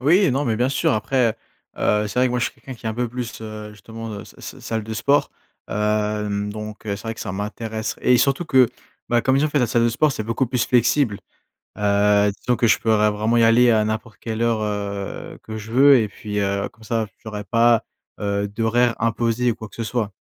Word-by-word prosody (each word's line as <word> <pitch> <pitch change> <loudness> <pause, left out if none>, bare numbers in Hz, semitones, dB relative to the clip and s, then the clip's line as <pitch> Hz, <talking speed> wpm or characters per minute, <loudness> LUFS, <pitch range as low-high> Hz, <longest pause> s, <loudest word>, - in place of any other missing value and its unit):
Oui, 170 +6 +4
non 135 +3 0
mais 115 -4 0
bien 125 +2 +1
sûr. 135 - +1
Après, 115 +1 +1 0.4
heu, 105 0 +2
c'est 105 - -4
vrai 130 - +5
que - - -1
moi 125 - 0
je 120 - +1
suis - - -3
quelqu'un 130 - -10
qui 115 - -9
est - - +1
un 110 - -3
peu 120 +1 -1
plus, 120 -1 -6
heu, 110 -1 -7
justement, 115 +2 -8
heu, 105 - -6
s - - -15
s - - -9
salle 110 -1 -3
de 110 +1 -5
sport. 140 +6 +2 0.4
Hem 105 -1 -1
donc 105 +1 -8
heu, 100 -1 -1
c'est 100 - -11
vrai 115 0 -3
que - - -10
ça 95 - -4
m'intéresse 110 +2 -4
et 125 - +4
surtout 135 +7 +2
que, 130 -5 +5 0.4
bah 120 0 +3
comme 130 0 +3
je - - +3
dis - - +2
en - - -5
fait 145 - +1
la 125 - +2
salle 115 +1 +1
de - - +4
sport 145 +6 +2
c'est 110 - -4
beaucoup 115 +4 0
plus 125 0 0
flexible. 120 -2 +2 0.6
Heu, 105 0 +3
disons 125 - +1
que 115 +1 +2
je 110 - +4
pourrais 110 -1 +3
vraiment 110 +3 0
y 115 - +5
aller 120 +2 +5
à 110 -1 +3
n'importe 110 0 -4
quelle 110 -1 -4
heure, 115 -2 +1
heu, 100 -1 -4
que 110 0 -6
je 110 +1 -9
veux 135 +3 +7
et 110 - 0
puis, 105 0 -5
heu, 100 0 0
comme 110 - -21
ça 110 -1 -1 0.2
j'aurais 105 -2 -6
pas, 115 +3 +3 0.4
heu, 100 0 -1
d'horaire 115 +3 +1
imposé 115 +1 +1
ou - - -4
quoi 110 -2 -9
que - - -16
ce 115 - -3
soit. 110 -2 -2
110 Hz, 245 wpm, -22 LUFS, 105-120 Hz, 0.6 s, veux